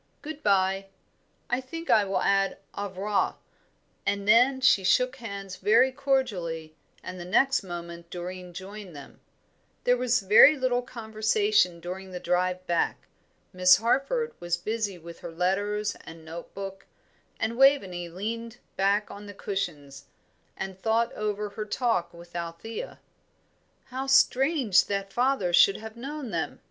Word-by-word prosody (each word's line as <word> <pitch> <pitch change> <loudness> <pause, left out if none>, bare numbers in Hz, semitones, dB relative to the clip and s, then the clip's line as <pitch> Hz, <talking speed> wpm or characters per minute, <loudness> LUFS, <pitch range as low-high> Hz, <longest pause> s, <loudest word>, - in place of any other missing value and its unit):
Good 305 0 -7
bye. 195 -1 +2 0.6
I 245 +2 0
think 330 +6 -5
I 210 -2 +5
will 195 - -1
add 195 0 +2 0.2
au 205 0 -3
revoir;" 195 +2 -1 0.7
and 200 0 -1
then 250 +5 +5
she 245 -6 +4
shook 250 +7 +2
hands 200 -5 -7
very 230 +5 +4
cordially, 205 - -1 0.3
and 185 0 -7
the - - -6
next 270 +10 +2
moment 170 -2 -8
Doreen 180 +1 -7
joined 190 0 -9
them. 140 - -12 0.6
There 245 - +4
was 250 -1 +1
very 215 +10 +7
little 255 -2 +1
conversation 220 - +1
during 185 +2 -7
the 180 -1 -6
drive 180 +1 0
back. 170 -1 0 0.5
Miss 180 0 +6
Harford 275 - 0
was 175 0 -1
busy 210 +1 -3
with 170 0 -11
her - - -8
letters 205 +5 -1
and 165 -1 -12
note 165 +2 -8
book, 195 -1 -7 0.5
and 225 +1 -1
Waveney 200 -11 +3
leaned 225 +6 -5 0.2
back 200 +2 +1
on 205 0 -10
the 205 - -10
cushions, 150 -10 -5 0.5
and 190 -1 -6
thought 230 +2 +1
over 210 0 -3
her 210 +1 -6
talk 225 -5 0
with 170 0 -14
Althea. 170 - -6 0.8
"How 265 +1 -5
strange 270 - +4
that 195 -1 -3
father 245 -8 +1
should 195 +3 +6
have 220 0 -9
known 270 0 -6
them!" 165 -2 -3
200 Hz, 145 wpm, -27 LUFS, 180-240 Hz, 0.8 s, very